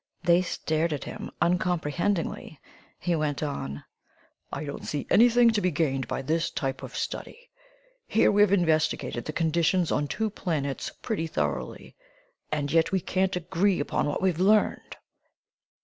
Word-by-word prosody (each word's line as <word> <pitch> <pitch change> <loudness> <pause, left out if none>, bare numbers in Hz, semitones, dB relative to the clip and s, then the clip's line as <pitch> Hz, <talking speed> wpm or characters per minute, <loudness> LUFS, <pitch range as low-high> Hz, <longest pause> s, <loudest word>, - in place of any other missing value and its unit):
They 175 +1 +5
stared 160 -2 -1
at 145 - -4
him - - -7
uncomprehendingly; 175 -2 -1 0.4
he 175 -1 0
went 150 -2 -1
on: 75 - -4 0.7
"I - - -4
don't 140 -1 -6
see 145 - -3
anything 240 +1 +6
to 215 -2 0
be 185 - +2
gained 145 -5 -1
by - - -3
this 160 +4 0
type 135 -2 -3
of - - -7
study. - - -6 0.6
Here - - +4
we've 205 -1 +4
investigated 155 -9 +1
the - - -3
conditions 165 +2 +1
on 145 - 0
two 220 +7 -2
planets 145 -9 -2
pretty 205 -9 -2
thoroughly, 75 - -3 0.6
and 145 -2 -1
yet 165 0 +3
we 190 - +2
can't 190 +1 0
agree 180 +2 +1
upon 145 - -1
what 145 - -2
we've 180 -3 +1
learned! 210 +3 +2
165 Hz, 150 wpm, -27 LUFS, 145-185 Hz, 0.7 s, anything